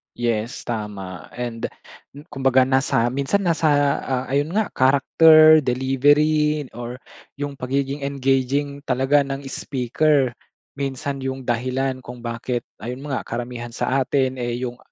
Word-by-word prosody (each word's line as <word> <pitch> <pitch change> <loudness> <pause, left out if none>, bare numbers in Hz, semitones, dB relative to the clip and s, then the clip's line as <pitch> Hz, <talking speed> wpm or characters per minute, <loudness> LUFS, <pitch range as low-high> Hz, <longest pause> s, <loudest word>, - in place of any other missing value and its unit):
Yes 120 +2 -2
tama 100 -5 -6
and 120 -2 -4 0.6
kumbaga 135 -2 +3
nasa 130 -2 +1
minsan 140 +10 0
nasa 150 -5 +2
ah, 130 -1 -1
ayun 145 +4 0
nga 220 -1 +1
character, 155 +4 +6
delivery, 145 +4 +2
or 120 +1 -7 0.4
yung 145 0 -5
pagiging 135 +2 -2
engaging 140 +1 0
talaga 135 +3 +3
ng 135 0 -5
speaker. 135 +1 +1 0.5
Minsan 140 0 -3
yung 130 0 -3
dahilan 130 +2 -1
kung 125 0 -9
bakit 120 +1 -3 0.2
ayun 125 +3 -6
nga 135 - -3
karamihan 120 0 -5
sa 135 +3 0
atin 130 -1 0
eh, 120 -1 -2
yung 125 -1 -4
130 Hz, 125 wpm, -22 LUFS, 125-140 Hz, 0.6 s, character